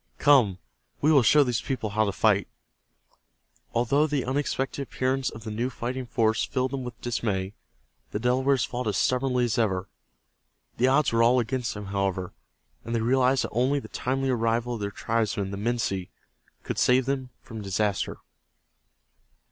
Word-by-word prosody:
"Come, 125 -11 +4 0.4
we 150 - +3
will 140 -3 +6
show 145 +5 +5
these 125 -3 -1
people 120 -6 -3
how 110 +1 +2
to 100 - 0
fight!" 100 -1 +2 1.2
Although 140 +6 +2
the 145 -4 -1
unexpected 135 +1 -1
appearance 130 0 -1
of 110 - -10
the 110 - -5
new 120 +4 -1
fighting 125 +1 -4
force 110 -2 +1
filled 130 -1 -1
them 135 -2 -3
with 125 -1 -8
dismay, 105 -5 -2 0.6
the - - -3
Delawares 130 +2 +2
fought 125 -1 -4
as 105 - 0
stubbornly 125 -1 +1
as 120 +1 -1
ever. 95 -4 0 0.9
The 125 - +3
odds 140 +2 +3
were 115 - +3
all 120 +2 +5
against 120 0 -2
them, 105 0 -6
however, 95 -2 -2 0.5
and 115 - -3
they 115 - +1
realized 130 +2 +3
that - - -4
only 130 +5 +1
the - - -11
timely 135 +1 -1
arrival 115 0 0
of 115 - -4
their 100 -1 -2
tribesmen, 110 -2 -1
the 100 - -4
Minsi, 105 -4 -1 0.5
could - - -3
save 125 0 +4
them 135 -1 -2
from 110 -2 -8
disaster. 100 0 -1
120 Hz, 165 wpm, -26 LUFS, 110-130 Hz, 1.2 s, will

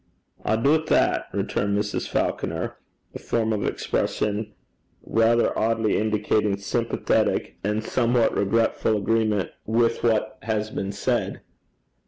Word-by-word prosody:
'I 110 - +1
doobt 150 +7 +2
that,' - - +2
returned 100 0 -1
Mrs. 105 0 -2
Falconer - - -2 0.4
a - - -7
form 110 -1 0
of 105 - -1
expression 105 +1 -1 0.5
rather 115 +1 +2
oddly 110 -1 +1
indicating 105 -1 +1
sympathetic 115 +4 0
and 105 +2 -1
somewhat 120 0 +2
regretful 110 +1 +1
agreement 105 -1 +1 0.2
with 115 +1 +2
what 110 -2 +1
has 110 -1 -2
been 95 - -3
said. - - -1
110 Hz, 115 wpm, -24 LUFS, 105-115 Hz, 0.5 s, doobt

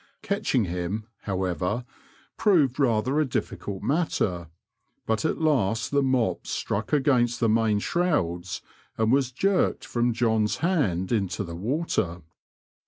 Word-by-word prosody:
Catching 200 - +1
him, 90 +5 -3 0.2
however, 95 +3 -1 0.5
proved 150 - +3
rather 130 +2 +2
a - - +4
difficult 100 -6 -4
matter, 100 - 0 0.6
but 110 +6 0
at - - 0
last 115 -9 +1
the 140 0 +3
mop 125 -9 0
struck 105 +2 -2
against 130 -5 +2
the 115 - +2
main 110 -1 +3
shrouds, 100 - -1 0.3
and 110 0 +2
was 135 -1 +2
jerked 190 +9 +1
from 120 0 0
John's 110 -2 +1
hand 100 - +1
into 100 -4 0
the 85 -3 -7
water. 100 - -1
115 Hz, 125 wpm, -26 LUFS, 95-140 Hz, 0.6 s, a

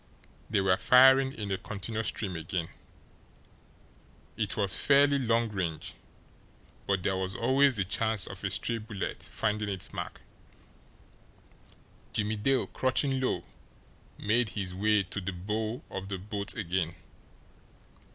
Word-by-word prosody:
They 105 - +2
were 95 -1 +3
firing 130 +1 +6
in 105 -5 -5
a 95 - -1
continuous 110 +2 -3
stream 95 -5 -2
again. 80 +1 -3 1.7
It - - -1
was 100 -2 +1
fairly 140 0 +5
long 115 -2 +2
range, 90 -6 -3 0.9
but 95 -2 +1
there 95 - +1
was 95 0 -2
always 135 +3 +3
the 100 - +2
chance 110 +1 +1
of - - -7
a - - 0
stray 115 -1 0
bullet 105 -3 -5
finding 105 -1 -2
its 95 -3 -5
mark. - - -6 1.9
Jimmie 105 +1 0
Dale, 130 +5 +2
crouching 130 +1 0
low, 130 - 0 0.7
made 115 +2 +1
his 95 -4 -4
way 105 +2 +2
to 100 +2 -4
the 95 +1 -3
bow 110 +6 -3
of 95 0 -5
the 100 - -2
boat 100 +1 -3
again. 90 -4 -1
105 Hz, 130 wpm, -29 LUFS, 95-115 Hz, 1.9 s, firing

